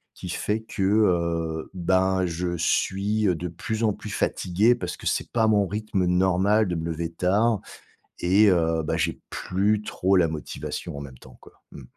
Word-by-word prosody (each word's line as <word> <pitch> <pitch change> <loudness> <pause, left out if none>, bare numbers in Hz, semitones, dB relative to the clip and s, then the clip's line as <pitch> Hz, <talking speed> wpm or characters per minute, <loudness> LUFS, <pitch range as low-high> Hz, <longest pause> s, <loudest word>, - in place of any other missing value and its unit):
qui - - -8
fait 105 +2 -2
que, 110 -2 -7
heu, 85 -6 +1
ben, 95 +1 +2
je 85 +1 -2
suis, 100 +5 +1
heu, 90 - +2
de 85 +2 -4
plus 110 +7 -4
en 110 - +3
plus 105 - -9
fatigué 100 +5 +2
parce 120 - -5
que - - -12
c'est - - -1
pas 115 -2 +2
mon 105 -2 +3
rythme 105 -2 -2
normal 95 +4 +3
de 90 - -1
me 80 -1 -3
lever 80 +1 -4
tard, 100 +6 +1 0.6
et 95 +5 +4
heu, 80 -2 +1
bah, 75 - -1
j'ai - - -1
plus 100 +3 0
trop 95 -2 0
la 85 -2 +4
motivation 75 -2 -6
en - - -5
même 65 -3 -10
temps 65 -2 -16
quoi, - - -16 0.2
mmh. 70 - -10
95 Hz, 185 wpm, -25 LUFS, 85-105 Hz, 0.6 s, et